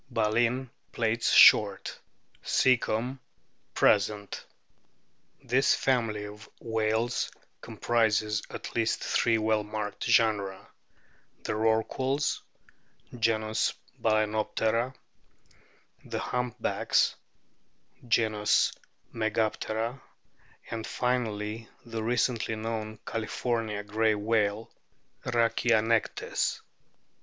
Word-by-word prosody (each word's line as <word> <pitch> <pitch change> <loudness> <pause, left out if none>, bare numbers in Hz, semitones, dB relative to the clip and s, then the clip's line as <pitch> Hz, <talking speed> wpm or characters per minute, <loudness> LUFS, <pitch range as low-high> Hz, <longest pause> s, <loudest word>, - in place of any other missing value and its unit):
Baleen 120 +3 +1 0.3
plates 115 0 0
short. 100 -2 +6 0.4
Caecum 125 0 +1 0.6
present.* 105 0 +2 1.0
This 135 +3 +3
family 115 -5 0
of 105 +2 -11
whales 110 +1 -1 0.3
comprises 110 -2 0
at - - -7
least 115 -1 0
three 115 -1 +2
well 110 -1 +1
marked 105 0 -5
genera: 110 -5 +2 0.8
the - - -2
Rorquals, 115 +6 0 0.8
genus 110 -1 +1 0.3
Balcen 110 -1 +2
optera; 115 +3 0 1.1
the - - -5
Humpbacks, 125 -1 0 0.9
genus 105 -2 +2 0.4
Megaptera; 110 +2 -1 0.7
and 115 -1 -4
finally 115 -3 -2 0.2
the 115 -1 -5
recently 115 0 0
known 110 0 -4
California 115 -1 -2
Grey 110 +1 +1
whale, 105 0 0 0.5
Rhachianectes. 115 -1 +1
110 Hz, 75 wpm, -28 LUFS, 110-115 Hz, 1.1 s, short